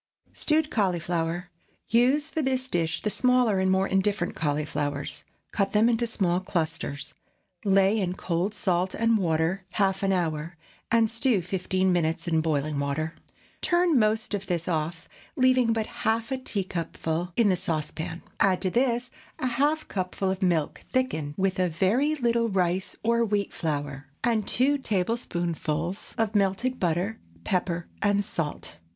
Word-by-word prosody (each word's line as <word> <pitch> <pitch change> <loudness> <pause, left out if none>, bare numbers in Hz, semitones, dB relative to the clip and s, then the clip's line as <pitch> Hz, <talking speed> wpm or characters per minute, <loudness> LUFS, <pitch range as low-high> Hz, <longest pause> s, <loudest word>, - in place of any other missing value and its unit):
STEWED 310 0 +1
CAULIFLOWER. 175 -3 -1 0.4
Use 265 +7 +3
for 320 - -1
this 260 -2 0
dish 165 -4 -1
the 210 - 0
smaller 250 -5 +3
and 190 0 +2
more 190 +1 +3
indifferent 195 -1 0
cauliflowers. 145 -1 -2 0.3
Cut 195 -2 0
them 215 +2 +5
into 235 0 +2
small 180 -5 +1
clusters; 155 -5 -3 0.5
lay 195 +2 +4
in 180 -3 0
cold 185 +3 -1
salt 185 -2 0
and 230 0 +3
water 165 +2 0
half 195 -2 +1
an 195 -1 +2
hour, 165 -2 -1 0.3
and 230 -1 +3
stew 230 -4 +1
fifteen 185 +1 0
minutes 165 0 0
in 160 -2 +2
boiling 150 -2 0
water. 145 +3 -1 0.5
Turn 345 -5 +3
most 220 +1 +1
of 205 -1 -3
this 170 -2 -1
off, 165 0 -2 0.3
leaving 255 -2 +4
but 225 -1 0
half 225 +3 -1
a 265 - +1
teacupful 175 -5 -3
in 225 -3 +5
the 185 - +4
saucepan. 165 -1 -3 0.2
Add 190 -1 +3
to 185 - +2
this 245 +1 +1 0.3
a - - -3
half 290 +6 +1
cupful 190 0 -2
of 190 +1 -4
milk 170 -5 +1
thickened 160 - -1
with 190 -1 0
a 180 -1 +2
very 225 - +2
little 235 -4 +1
rice 185 -1 0
or 235 +1 +3
wheat 205 -3 0
flour, 145 -3 -3 0.2
and 225 -4 +1
two 280 +4 +2
tablespoonfuls 175 - -2
of 225 -1 0
melted 205 +6 +1
butter, 180 +5 0 0.2
pepper, 175 - -1
and 205 0 +2
salt. 165 -7 -4
190 Hz, 150 wpm, -27 LUFS, 170-230 Hz, 0.5 s, them